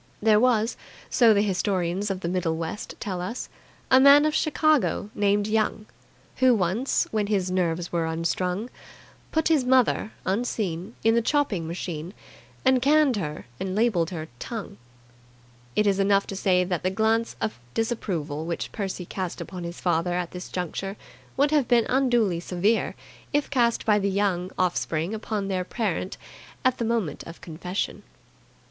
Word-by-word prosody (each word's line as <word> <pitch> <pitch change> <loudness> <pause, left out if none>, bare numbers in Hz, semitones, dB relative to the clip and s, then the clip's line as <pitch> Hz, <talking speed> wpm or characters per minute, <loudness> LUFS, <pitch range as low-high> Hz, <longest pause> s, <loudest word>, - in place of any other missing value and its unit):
There 210 0 +4
was, 230 -1 +2 0.3
so 235 -3 +6
the 205 -1 +4
historians 190 -1 0
of 190 -1 -3
the 170 - -2
Middle 170 -2 0
West 165 +5 -5
tell 185 -4 -3
us, 230 +8 -5 0.4
a 260 - +8
man 280 +2 +8
of 305 - +1
Chicago 305 -9 +2
named 205 0 +2
Young, 215 0 0 0.5
who 255 -2 +5
once, 205 +7 +1
when 215 -2 0
his 190 -3 0
nerves 175 -2 0
were 170 -1 0
unstrung, 180 +7 -2 0.6
put 320 0 +1
his 310 -5 +4
mother 250 -4 +3
(unseen) 195 -2 -2
in 225 - +4
the 235 - +3
chopping 225 - 0
machine, 170 +1 -5 0.5
and 260 -1 +4
canned 290 -2 +4
her 150 -5 -4
and 190 0 -3
labelled 205 -7 +2
her 160 -3 -5
"Tongue". 220 - -6 1.0
It 210 - +3
is 200 -1 +2
enough 195 0 +3
to 195 - -6
say 185 -1 +2
that 180 -2 -2
the 185 - +1
glance 220 - +1
of 110 +2 -3 0.2
disapproval 170 -10 -2
which 170 - -3
Percy 190 -3 -4
cast 185 0 -4
upon 180 -2 -6
his 170 0 -6
father 175 0 +1
at 175 -1 -2
this 180 0 -7
juncture 195 +3 -4 0.4
would 285 +2 +3
have 295 -5 +3
been 235 -2 +4
unduly 240 -9 +2
severe 185 +6 0 0.4
if 290 0 0
cast 235 -4 +2
by 210 -2 +4
the 200 0 0
Young 190 -2 0
offspring 175 0 0
upon 215 -2 -3
their 185 -2 -1
parent 190 -2 -2 0.5
at 255 -1 +2
the 235 - 0
moment 220 -10 -1
of 165 - -10
confession. 180 +3 -4
200 Hz, 160 wpm, -25 LUFS, 180-230 Hz, 1.0 s, a